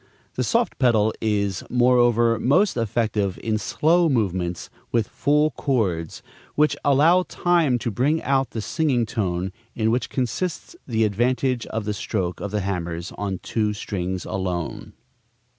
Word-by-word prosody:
The - - -1
soft 235 -1 0
pedal 110 -4 +3
is, 100 -4 0
moreover, 120 -2 +3
most 150 - +3
effective 110 -4 -1
in 110 -1 0
slow 165 - +2
movements 95 - -1 0.2
with 115 -3 +1
full 150 +2 +2
chords, 95 - -1 0.3
which 150 +1 +3
allow 155 +6 +5
time 170 -7 +1
to 120 0 -3
bring 140 +10 +1
out 135 -2 +1
the 115 - -4
singing 135 -2 0
tone, 95 -5 -2 0.2
in 110 -1 +1
which 125 +2 -1
consists 145 - -3
the 115 -3 +1
advantage 120 +4 0
of 110 -1 -4
the 105 - -1
stroke 95 -3 -3
of 100 - -4
the 105 +1 -1
hammers 85 -2 -3
on 100 -3 -4
two 105 -2 0
strings 95 -3 -4
alone. 90 -3 -4
115 Hz, 140 wpm, -23 LUFS, 100-135 Hz, 0.3 s, allow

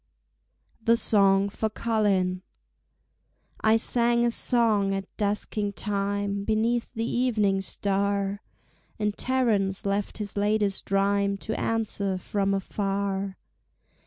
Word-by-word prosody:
The 230 +1 +4
Song 195 -3 +4
for 220 +2 -2
Colin 200 -5 0 1.2
I 220 +1 +5
sang 235 +1 +2
a 235 - +2
song 220 -5 +2
at 195 0 -3
dusking 205 0 -1
time 200 0 -2
Beneath 225 +3 0
the 225 0 -1
evening 215 -7 +1
star, 200 +1 -1 0.6
And 210 -1 -1
Terence 215 -8 0
left 200 0 -1
his 205 -2 -5
latest 205 -1 +1
rhyme 200 0 +1
To 220 - -5
answer 205 -5 -1
from 195 +1 -1
afar. 195 0 -2
200 Hz, 105 wpm, -26 LUFS, 195-220 Hz, 1.2 s, I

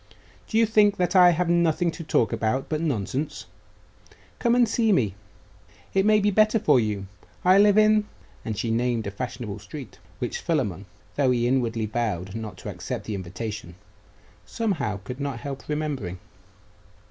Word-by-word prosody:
Do 220 - -1
you 230 - +5
think 210 -2 +4
that 180 +2 0
I 180 -1 +8
have 175 +1 +1
nothing 170 0 +2
to 165 - -8
talk 115 -8 +1
about 115 +5 -1
but 155 0 -1
nonsense? 140 0 -2 0.9
Come 235 -1 +3
and 245 -1 +4
see 225 0 +2
me. 115 - +2 0.8
It 195 +1 +3
may 215 0 +5
be 205 0 +2
better 215 +2 +4
for 150 - +4
you. 105 -3 -2 0.4
I 185 +2 +6
live 205 0 +5
in 215 0 +4 0.2
' 95 -1 -29
and 110 -2 -4
she 115 - -1
named 120 -1 0
a 100 - -3
fashionable 115 -1 -5
street, 140 -7 -10 0.2
which - - -3
Philammon, - - -2 0.3
though 140 -3 +3
he 120 -1 +2
inwardly 120 -3 0
vowed 105 -5 -2
not 110 -4 -6
to - - -7
accept - - -5
the 110 - -4
invitation, 95 0 -6 0.7
somehow 160 - -2
could 125 +7 -7
not 140 -4 -3
help 140 -1 -7
remembering. 145 - -3
135 Hz, 170 wpm, -25 LUFS, -, 0.9 s, I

